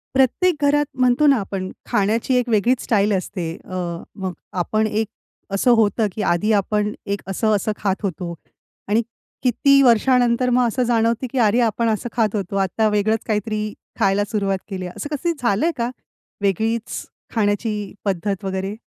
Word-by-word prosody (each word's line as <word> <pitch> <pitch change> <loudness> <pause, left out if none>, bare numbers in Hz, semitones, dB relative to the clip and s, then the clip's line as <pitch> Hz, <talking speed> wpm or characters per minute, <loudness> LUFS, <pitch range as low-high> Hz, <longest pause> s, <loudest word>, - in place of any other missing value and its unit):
प्रत्येक 290 +7 +3
घरात 290 +1 +3
म्हणतो 255 +3 +3
ना 275 -2 +6
आपण 190 -2 -4 0.2
खाण्याची 220 +5 +1
एक 250 -1 +1
वेगळीच 235 +3 +2
स्टाईल 210 -2 +2
असते. 180 -3 -3
अ, 185 - -7 0.4
मग 190 -2 -4 0.3
आपण 215 +5 +1
एक 215 +1 -1 0.5
असं 200 +5 +3
होतं, 220 0 +2
की 215 - -4
आधी 210 +6 0
आपण 210 +1 0
एक 200 0 -2
असं-असं 215 +1 +1
खात 195 -2 0
होतो. 175 -2 -3 0.5
आणि 215 +3 +3 0.4
किती 275 +3 +4
वर्षानंतर 245 0 +4
मग 250 0 +3
असं 250 +3 0
जाणवतं, 230 +1 +1
की 270 - -4
"अरे 220 +4 +2
आपण 230 0 +1
असं 220 +2 -1
खात 220 -3 +1
होतो, 195 -1 -3
आता 195 +3 +1
वेगळंच 210 +1 +1
काहीतरी 215 0 -1 0.3
खायला 195 +1 +3
सुरुवात 200 -3 0
केली 185 -2 -4
आहे." 180 - -7
असं 295 +1 -4
कसं 340 +4 -1
झालंय 235 +8 +2
का, 235 0 0 0.5
वेगळीच 220 +4 -1 0.3
खाण्याची 210 0 +1 0.3
पद्धत 195 +1 -1
वगैरे? 190 +1 -3
215 Hz, 160 wpm, -21 LUFS, 200-240 Hz, 0.5 s, ना